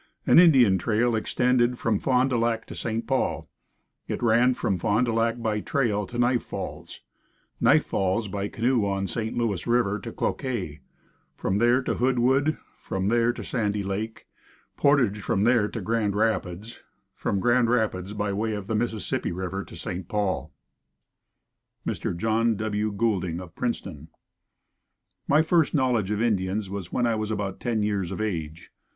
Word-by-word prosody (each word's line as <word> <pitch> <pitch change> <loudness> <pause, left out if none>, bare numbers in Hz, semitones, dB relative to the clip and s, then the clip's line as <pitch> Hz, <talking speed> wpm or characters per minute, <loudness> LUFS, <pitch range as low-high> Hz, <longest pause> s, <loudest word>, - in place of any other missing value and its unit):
An - - +7
Indian 130 - +6
trail 115 +4 +1
extended 125 +2 +1
from 110 -4 0
Fond 130 0 +2
du 125 - +2
Lac 115 -1 0
to - - -9
St. 115 0 -3
Paul. 135 -1 -1 0.6
It - - -4
ran 120 +2 +4
from 100 -7 -1
Fond 110 +8 +2
du 115 - -1
Lac 115 +1 +1
by 110 -2 -1
trail 105 -5 0
to 120 - -7
Knife 120 0 +2
Falls, - - -7 0.6
Knife - - +4
Falls 95 +3 0
by 100 0 -3
canoe 120 +2 +1
on 100 -1 -1
St. 110 +2 -3
Louis 110 -6 -1
river 115 -4 +2
to - - -7
Cloquet, 95 - -3 0.6
from 95 +1 -1
there 120 +3 +3
to - - -1
Hoodwood, 130 +4 +2 0.2
from 95 +1 -2
there 120 +1 +3
to - - -8
Sandy 105 -4 -1
Lake, 105 +3 -4 0.5
portage 125 -8 +2
from 100 0 0
there 115 -2 +3
to 115 - -5
Grand 105 0 0
Rapids, 105 0 -1 0.3
from 100 - -2
Grand 120 +2 +3
Rapids 105 -5 0
by 105 -1 -2
way 110 +2 -1
of 105 -2 -4
the 110 - -3
Mississippi 110 -1 -1
river 95 +2 -4
to - - -13
St. 90 +1 -5
Paul. 105 -3 -1 1.3
Mr. 85 - -3
John 115 +3 +1
W. 105 0 -1
Goulding 100 -5 -1
of 90 -3 -10
Princeton. 90 - -4 1.2
My 150 +2 +4
first 165 -1 +2
knowledge 125 -8 +1
of 105 +1 0
Indians 100 -2 0
was 100 -3 -6
when 120 - +1
I 115 - +2
was 110 -1 -2
about 100 -3 -3
ten 115 -3 -1
years 100 -4 -1
of - - -5
age. 85 -6 -4
110 Hz, 165 wpm, -26 LUFS, 100-120 Hz, 1.3 s, An